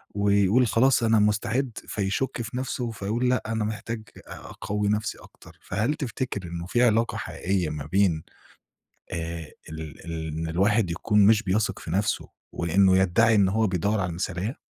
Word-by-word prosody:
ويقول 100 +4 +3
خلاص 125 +3 +3
أنا 110 -1 +4
مُستعد، 115 +5 +1 0.2
فيشُك 105 +5 -2
في 120 +2 -5
نفسه، 125 -2 -3
فيقول 110 +4 -1
لأ 125 - +1
أنا 110 -1 -1
محتاج 110 +1 -4 0.3
أ - - -8
أقوّي 105 0 -3
نفسي 105 0 -1
أكتر. - - -17
فهل 110 +10 0
تفتكر 130 - -4
إنه 85 0 -5
في 120 +5 +2
علاقة 115 0 +2
حقيقية 90 -4 -2
ما 75 -2 -5
بين 90 -2 +2 0.9
آآ 85 -2 -4 0.2
ال 80 -3 -8
ال 80 -1 -4
إن 80 +1 -3
الواحد 100 +3 +2
يكون 105 +3 +3
مش 110 0 +5
بيَثِق 105 +3 0
في - - -7
نفسه 100 +2 0 0.2
وإنه 95 +3 +3
يدّعي 110 +5 +4
إن 100 -2 +4
هو 110 +2 +2
بيدوّر 100 +4 0
على 90 - -1
المثالية؟ 90 - -3
105 Hz, 165 wpm, -26 LUFS, 90-115 Hz, 0.9 s, مش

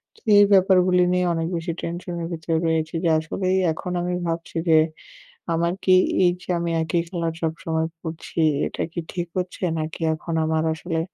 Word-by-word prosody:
তো - - -22 0.2
এই 205 - +8
ব্যাপারগুলি 185 -1 +5
নিয়ে 180 0 +2
অনেক 165 0 -1
বেশি 170 0 -3
টেনশন 175 +1 -5
এর - - -3
ভিতরে 165 0 -2
রয়েছি 160 0 0
যে 170 - +3
আসলেই 185 +4 -1 0.2
এখন 180 +3 -6
আমি 180 +1 -2
ভাবছি 165 0 -4
যে, 160 - +7 0.8
"আমার 170 +1 +1
কি 185 - +5 0.3
এই 175 - +5
যে - - -15
আমি 170 0 -1
একই 165 +2 0
কালার 170 -2 -2
সবসময় 160 0 -1
পড়ছি 165 0 -6 0.3
এটা - - -4
কি 170 - -4
ঠিক 175 -1 -3
হচ্ছে? 180 +1 -4 0.2
নাকি 155 +2 -5
এখন 160 +2 -5
আমার 160 0 +1
আসলে 165 +1 -3
170 Hz, 180 wpm, -23 LUFS, 160-180 Hz, 0.8 s, এই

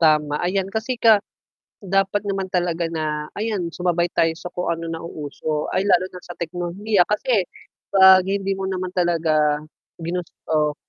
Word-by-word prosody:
Tama, 150 -2 +3
ayan 190 +2 0
kasi 230 +3 -2
ka 220 -4 +5 0.6
dapat 195 +1 0
naman 195 -2 -2
talaga 175 -2 0
na, 155 -2 -3
ayan 205 -6 -2
sumabay 175 0 0
tayo 165 -1 +2
sa 175 +2 -8
kung 180 0 -4
ano 165 0 -2
nauuso. 155 -2 -4
Ay 195 - 0
lalo 185 -1 +3
na 180 - -10
sa 175 - -8
teknolohiya 175 +4 0
kasi, 210 -1 +1 0.5
'pag 190 -1 +8
hindi 195 0 -1
mo 195 - -3
naman 185 -1 -2
talaga, 155 -4 +2 0.4
ginusto, 160 -3 -2
180 Hz, 150 wpm, -22 LUFS, 165-195 Hz, 0.6 s, pag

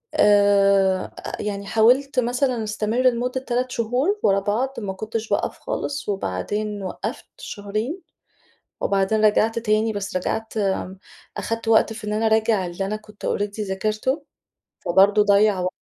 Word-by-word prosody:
آآ، 200 -2 +4 0.3
يعني 200 -1 -4
حاولت 255 +6 +3
مثلًا 245 0 0
أستمر 215 +2 -2
لمدة 250 +1 +1
3 250 0 -2
شهور 250 - 0
ورا 195 0 +4
بعض، 225 +7 -1
ما 195 -3 -4
كنتش 220 +2 -4
باقف - - -1
خالص، 285 -6 -4
وبعدين 205 - -3
وقّفت 215 +7 -5
شهرين، 215 - -4 0.8
وبعدين 200 +2 +2
رجعت 220 +2 +3
تاني، 220 0 +1
بس 200 -2 -5
رجعت 220 +4 -3
امم، 190 -2 -1 0.4
أخدت 230 0 -3
وقت 225 0 +4
في 215 -1 -8
إن 210 - -1
أنا 220 +1 0
أراجع 220 -3 +2
اللي 175 +2 -4
أنا 210 +2 -2
كنت 210 -1 -12
already 205 +1 -2
ذاكرته. 215 +8 -1 0.6
فبرضه 195 +4 +5
ضيّع 205 -1 +4
وق 180 0 -1
215 Hz, 140 wpm, -23 LUFS, 200-230 Hz, 0.8 s, فبرضه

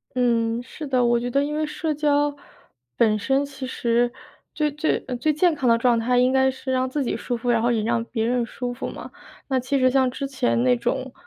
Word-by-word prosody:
嗯， 235 -2 +1
是 300 +4 -8
的。 255 -2 +2
我 240 0 +3
觉 245 +1 -3
得 275 +3 +1
因 295 +1 -3
为 310 0 0
社 305 +1 -3
交 290 -1 +1 0.6
本 215 - +3
身 270 +6 +1
其 275 -2 -7
实 240 -1 +1 0.4
最 300 -1 0
最 300 +2 -1
呃， 255 - -3
最 305 +5 +1
健 340 +3 +3
康 265 -5 0
的 230 - +5
状 235 0 +2
态 245 +2 +1
应 250 +1 +4
该 265 0 +3
是 265 0 -5
让 255 0 0
自 285 +2 -1
己 245 - -2
舒 245 - -3
服， 245 +1 -3
然 235 -2 +3
后 240 +1 +2
也 225 -2 0
让 230 +1 0
别 225 -1 -2
人 245 0 +1
舒 245 +1 -5
服 250 - -5
嘛。 - - -8 0.4
那 265 -2 +1
其 255 +3 -1
实 255 0 +4
像 260 0 +3
之 270 +2 -5
前 120 - 0
那 125 -1 +4
种， 260 - -2
255 Hz, 255 characters per minute, -23 LUFS, 235-275 Hz, 0.6 s, 的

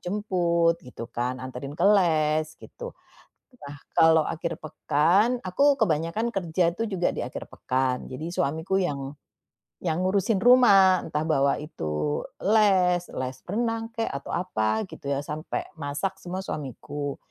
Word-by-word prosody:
jemput 175 -4 +1
gitu 125 -2 -9
kan, 125 +2 -2
antarin 130 +3 -7
ke - - 0
les, 155 -4 +2
gitu. - - -10 0.6
Nah, 145 0 -9 0.2
kalau 160 -1 +5
akhir 165 +1 -3
pekan, 170 - +2
aku 280 +10 +3
kebanyakan 210 - 0
kerja 175 -3 0
tuh 225 +6 -3
juga 190 -4 0
di - - -6
akhir - - -6
pekan. 130 0 -1
Jadi 155 +6 -6
suamiku 160 +5 0
yang 140 -6 -2 0.7
yang 170 0 -1
ngurusin 195 +2 +1
rumah, 200 -7 +7
entah 150 -1 -2
bawa 140 -3 +2
itu 75 - -3 0.2
les, 190 -4 +4 0.2
les 130 0 -4
renang 225 +3 -1
kek 225 -1 -1
atau 140 - -5
apa 110 -12 0
gitu - - -9
ya, 140 0 -1
sampai 150 +2 -4 0.2
masak 145 +7 -3
semua 185 +2 -5
suamiku. 145 -1 -5
165 Hz, 140 wpm, -26 LUFS, 145-190 Hz, 0.7 s, rumah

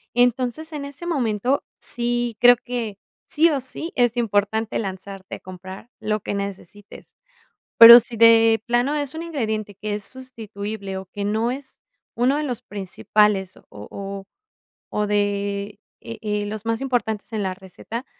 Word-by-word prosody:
entonces 250 +6 +1
en 285 -1 -5
ese 285 +4 -9
momento 255 - 0
sí 240 -1 -1
creo 245 0 +8
que 235 -5 -5 0.3
sí 320 +2 +3
o 280 - 0
sí 290 +6 -3
es 245 -1 +2
importante 220 0 0
lanzarte 195 -1 -6
a - - -11
comprar 185 +5 -11
lo 215 -1 -1
que - - -4
necesites. 200 0 -8 0.6
Pero 235 +1 +12
sí 240 0 -3
de 225 -1 +6
plano 245 +4 +1
es 290 -1 -2
un 330 - -5
ingrediente 220 -10 -3
que 205 +2 -4
es 205 -1 -4
sustituible 215 -6 -6
o 190 - -9
que 200 +2 -6
no 220 +3 0
es 265 +1 -8 0.3
uno 250 +4 +2
de 300 - -1
los 250 -5 -4
principales 195 0 0
o - - -19
o 195 - -8 0.7
o 210 0 -1
de, 205 0 -1 0.2
e 230 -1 -8
eh, 210 -1 -2
los 215 +1 -6
más 230 +3 -1
importantes 230 -5 -2
en 215 - -2
la 190 -1 -2
receta, 195 +6 -8
220 Hz, 160 wpm, -22 LUFS, 200-245 Hz, 0.7 s, Pero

